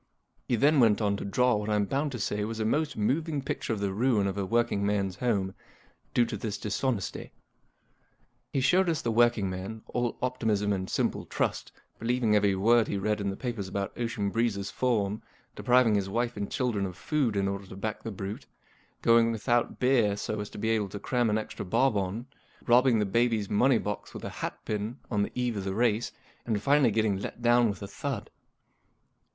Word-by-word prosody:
He 120 Hz, -, +2 dB
then 145 Hz, +5 st, +4 dB
went 110 Hz, -4 st, +5 dB
on 100 Hz, -2 st, +1 dB
to -, -, -5 dB
draw 125 Hz, +4 st, +2 dB
what 105 Hz, +1 st, -3 dB
I'm 105 Hz, -1 st, +2 dB
bound 140 Hz, +7 st, -1 dB
to -, -, -3 dB
say 105 Hz, 0 st, -1 dB
was 110 Hz, +1 st, -4 dB
a 110 Hz, -, 0 dB
most 150 Hz, +7 st, 0 dB
moving 150 Hz, +8 st, 0 dB
picture 135 Hz, -, -3 dB
of 110 Hz, -, -1 dB
the 100 Hz, -1 st, -1 dB
ruin 110 Hz, -1 st, +2 dB
of 95 Hz, -1 st, -1 dB
a 100 Hz, -2 st, -2 dB
working 115 Hz, -2 st, +1 dB
man's 100 Hz, -2 st, 0 dB
home, 100 Hz, -6 st, 0 dB, 0.6 s
due 120 Hz, -, +5 dB
to 115 Hz, -1 st, -4 dB
this 105 Hz, 0 st, -4 dB
dishonesty. 105 Hz, 0 st, -2 dB, 1.2 s
He 135 Hz, -, 0 dB
showed 175 Hz, +7 st, +3 dB
us 160 Hz, -3 st, -1 dB
the 115 Hz, -, 0 dB
working 120 Hz, -3 st, +3 dB
man, 95 Hz, +4 st, -6 dB
all 120 Hz, -1 st, -1 dB
optimism 110 Hz, -5 st, 0 dB
and 95 Hz, -1 st, -3 dB
simple -, -, -1 dB
trust, -, -, -2 dB, 0.3 s
believing 115 Hz, -2 st, +1 dB
every 100 Hz, -2 st, +3 dB
word 115 Hz, +4 st, +4 dB
he 100 Hz, -, -2 dB
read 105 Hz, +1 st, -1 dB
in 100 Hz, -, -1 dB
the 95 Hz, -, -3 dB
papers 120 Hz, -7 st, -4 dB
about 100 Hz, +1 st, -3 dB
Ocean 115 Hz, -4 st, -2 dB
Breeze's 105 Hz, -4 st, -1 dB
form; 110 Hz, -5 st, 0 dB, 0.3 s
depriving 125 Hz, -3 st, +4 dB
his 100 Hz, -2 st, 0 dB
wife 120 Hz, +3 st, -1 dB
and 100 Hz, -1 st, -4 dB
children 115 Hz, -7 st, -1 dB
of 90 Hz, -1 st, -9 dB
food 140 Hz, -8 st, 0 dB
in 100 Hz, 0 st, +1 dB
order 100 Hz, 0 st, -4 dB
to 95 Hz, -, -10 dB
back 105 Hz, +3 st, -4 dB
the 115 Hz, -, -5 dB
brute; 100 Hz, 0 st, -6 dB, 0.6 s
going 115 Hz, 0 st, +5 dB
with¬ 110 Hz, -2 st, -6 dB
out 120 Hz, 0 st, +2 dB
beer 120 Hz, -6 st, +3 dB
so 110 Hz, +1 st, -3 dB
as 105 Hz, -, -4 dB
to -, -, -11 dB
be 110 Hz, +2 st, -1 dB
able 105 Hz, -3 st, 0 dB
to 100 Hz, -, -6 dB
cram 120 Hz, +2 st, 0 dB
an 105 Hz, -, +2 dB
extra 110 Hz, -, -5 dB
bob 125 Hz, +6 st, +2 dB
on; 100 Hz, +4 st, -2 dB, 0.4 s
robbing 125 Hz, 0 st, +5 dB
the 105 Hz, -, +1 dB
baby's 115 Hz, 0 st, +1 dB
n.onev 120 Hz, +3 st, +3 dB
box 105 Hz, 0 st, -5 dB
with -, -, -7 dB
a -, -, -5 dB
hatpin 105 Hz, +2 st, -3 dB, 0.2 s
on 105 Hz, -3 st, +1 dB
the 100 Hz, -, -1 dB
eve 125 Hz, -2 st, -1 dB
of 100 Hz, -, -3 dB
the 95 Hz, 0 st, -3 dB
race; 115 Hz, 0 st, +1 dB, 0.3 s
and 110 Hz, -3 st, -1 dB
finally 140 Hz, -3 st, +4 dB
getting 110 Hz, -2 st, +1 dB
let 120 Hz, -, -7 dB
down 120 Hz, -1 st, +5 dB
with 100 Hz, 0 st, -5 dB
a -, -, -5 dB
thud. 100 Hz, -, -5 dB
110 Hz, 205 wpm, -28 LUFS, 100-120 Hz, 1.2 s, went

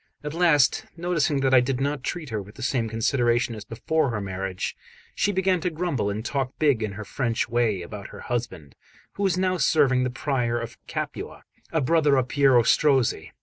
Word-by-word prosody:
At 150 Hz, 0 st, -4 dB
last, 165 Hz, -5 st, +3 dB
noticing 165 Hz, -5 st, 0 dB
that 135 Hz, -1 st, +2 dB
I 130 Hz, -, +8 dB
did 125 Hz, +1 st, -1 dB
not 140 Hz, 0 st, -1 dB
treat 155 Hz, 0 st, -5 dB
her 110 Hz, -2 st, -2 dB
with 105 Hz, +2 st, -13 dB
the 130 Hz, -, -8 dB
same 120 Hz, -3 st, 0 dB
consideration 120 Hz, +1 st, +1 dB
as 105 Hz, -2 st, -7 dB
before 140 Hz, +7 st, -1 dB
her 110 Hz, -3 st, -2 dB
marriage, 95 Hz, -1 st, -4 dB, 0.4 s
she 205 Hz, -, +1 dB
began 190 Hz, -2 st, +1 dB
to 180 Hz, -, 0 dB
grumble 155 Hz, -, -1 dB
and 105 Hz, +3 st, -4 dB
talk 135 Hz, 0 st, -2 dB
big 145 Hz, -7 st, +2 dB
in 105 Hz, -2 st, -2 dB
her 105 Hz, +1 st, -7 dB
French 115 Hz, 0 st, -1 dB
way 115 Hz, -6 st, 0 dB
about 100 Hz, +2 st, -8 dB
her -, -, -11 dB
husband, 95 Hz, -, -4 dB, 0.4 s
who -, -, -7 dB
was 190 Hz, -3 st, +2 dB
now 185 Hz, 0 st, +1 dB
serving 135 Hz, -4 st, +3 dB
the 125 Hz, -, 0 dB
Prior 125 Hz, -3 st, -1 dB
of 115 Hz, 0 st, -6 dB
Capua, -, -, -5 dB, 0.3 s
a 160 Hz, -, +1 dB
brother 145 Hz, 0 st, +3 dB
of 130 Hz, -1 st, 0 dB
Piero 135 Hz, -4 st, +4 dB
Strozzi. 135 Hz, -1 st, +2 dB
130 Hz, 195 wpm, -25 LUFS, 115-150 Hz, 0.4 s, I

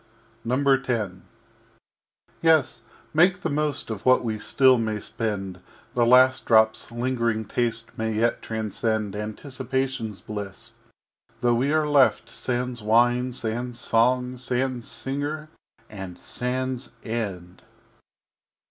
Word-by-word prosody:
X 135 Hz, +1 st, +2 dB, 1.5 s
Yes, 160 Hz, -7 st, +3 dB, 0.3 s
make 180 Hz, +3 st, +4 dB
the 165 Hz, -, -2 dB
most 150 Hz, -4 st, 0 dB
of 105 Hz, -3 st, -5 dB
what 130 Hz, 0 st, +4 dB
we 110 Hz, -2 st, -2 dB
still 130 Hz, +4 st, +4 dB
may 110 Hz, -2 st, -1 dB
spend; 100 Hz, -4 st, -4 dB, 0.3 s
The 120 Hz, -2 st, +2 dB
last 130 Hz, +1 st, +5 dB
Drop's 110 Hz, -1 st, +3 dB
lingering 115 Hz, -2 st, -1 dB
Taste 115 Hz, +1 st, -1 dB
may 110 Hz, 0 st, -1 dB
yet 115 Hz, +2 st, +1 dB
transcend 110 Hz, -1 st, -2 dB
Anticipation's 130 Hz, 0 st, -3 dB
Bliss 100 Hz, -3 st, -7 dB, 0.7 s
though 120 Hz, -1 st, +3 dB
we 130 Hz, +5 st, +1 dB
are 155 Hz, -1 st, +2 dB
left 140 Hz, -3 st, +3 dB
Sans 125 Hz, -1 st, -3 dB
Wine, 120 Hz, +3 st, +3 dB
Sans 120 Hz, 0 st, -4 dB
Song, 125 Hz, +2 st, +2 dB
Sans 125 Hz, -1 st, -2 dB
Singer, 145 Hz, +6 st, -4 dB, 0.4 s
and 95 Hz, -4 st, -8 dB
Sans 130 Hz, 0 st, -3 dB
End. 95 Hz, -6 st, -5 dB
120 Hz, 110 wpm, -25 LUFS, 110-130 Hz, 1.5 s, last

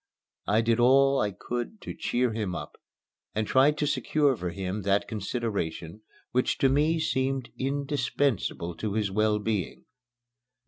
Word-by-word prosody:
I 110 Hz, +2 st, +3 dB
did 115 Hz, 0 st, +1 dB
all 135 Hz, +2 st, +5 dB
I 105 Hz, -, +1 dB
could 120 Hz, -, -5 dB
to -, -, -6 dB
cheer 125 Hz, -1 st, 0 dB
him 105 Hz, -5 st, -2 dB
up, -, -, -7 dB, 0.6 s
and 110 Hz, 0 st, 0 dB
tried 140 Hz, +6 st, +4 dB
to 150 Hz, -, 0 dB
secure 145 Hz, 0 st, +2 dB
for 90 Hz, -5 st, -4 dB
him 95 Hz, +3 st, -4 dB
that 100 Hz, +1 st, +1 dB
consideration 100 Hz, -5 st, -3 dB, 0.3 s
which 125 Hz, +1 st, +1 dB
to 135 Hz, -, +3 dB
me 150 Hz, +4 st, +2 dB
seemed 135 Hz, -4 st, -1 dB
indispensable 135 Hz, -, -1 dB
to 105 Hz, -2 st, -3 dB
his 105 Hz, -2 st, 0 dB
well 105 Hz, +1 st, +2 dB
being. 105 Hz, -4 st, -3 dB
115 Hz, 145 wpm, -27 LUFS, 105-135 Hz, 0.6 s, all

